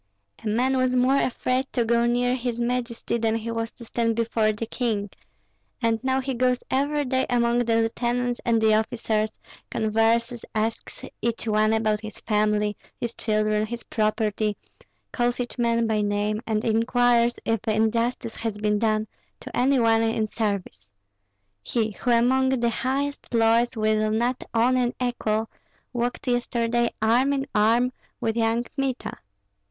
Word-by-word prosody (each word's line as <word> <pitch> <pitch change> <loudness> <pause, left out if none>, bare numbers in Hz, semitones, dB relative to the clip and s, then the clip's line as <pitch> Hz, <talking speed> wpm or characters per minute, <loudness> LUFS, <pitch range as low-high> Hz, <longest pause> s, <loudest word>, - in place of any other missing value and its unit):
A - - -4
man 250 +5 +1
was 255 0 +2
more 260 +2 +3
afraid 255 +1 0
to 240 -2 +1
go 235 +1 +2
near 245 +1 +2
his 245 -2 -2
majesty 235 -1 -1
than 225 -1 +1
he 230 0 -3
was 230 0 -2
to 235 - -12
stand 230 0 0
before 225 -1 +1
the 215 +2 -4
king; 220 -4 -2 0.7
and 230 -1 0
now 260 0 +1
he 265 0 -2
goes 250 0 +1
every 285 +2 +1
day 260 0 0
among 235 0 +2
the 235 -2 +1
lieutenants 240 +2 -1
and 230 -1 +2
the 220 -1 +4
officers, 220 0 0 0.4
converses, 225 +2 +1
asks 220 +1 -3 0.2
each 230 0 -2
one 215 0 +3
about 215 -1 +1
his 215 -2 -8
family, 210 -1 +1 0.2
his 235 -1 -3
children, 215 -1 0
his 235 +1 -6
property, 215 -1 0 0.5
calls 245 0 0
each 245 0 -4
man 235 -1 +2
by 220 -1 +1
name, 205 +1 0
and 215 -1 0
inquires 235 +1 +3
if 225 -1 +1
injustice 230 +2 0
has 225 -2 -3
been 210 0 +1
done 215 -1 +1 0.3
to - - -9
any 265 +3 +3
one 225 -2 +4
in 225 -1 +1
service. 200 - -3 0.7
He 220 - -1
who 235 - -4
among 255 +3 +3
the 240 -3 +1
highest 275 +4 -2
lords 230 +1 +3
will 215 0 +2
not 240 +4 0
own 245 +3 +3
an 245 -1 0
equal, 225 -3 -1 0.4
walked 245 +1 -2
yesterday 240 -1 +1
arm 250 +5 +3
in 270 -1 -1
arm 230 +4 +3 0.3
with 225 -3 -1
young 230 +1 +1
Kmita. 270 0 -4
230 Hz, 155 wpm, -25 LUFS, 220-245 Hz, 0.7 s, the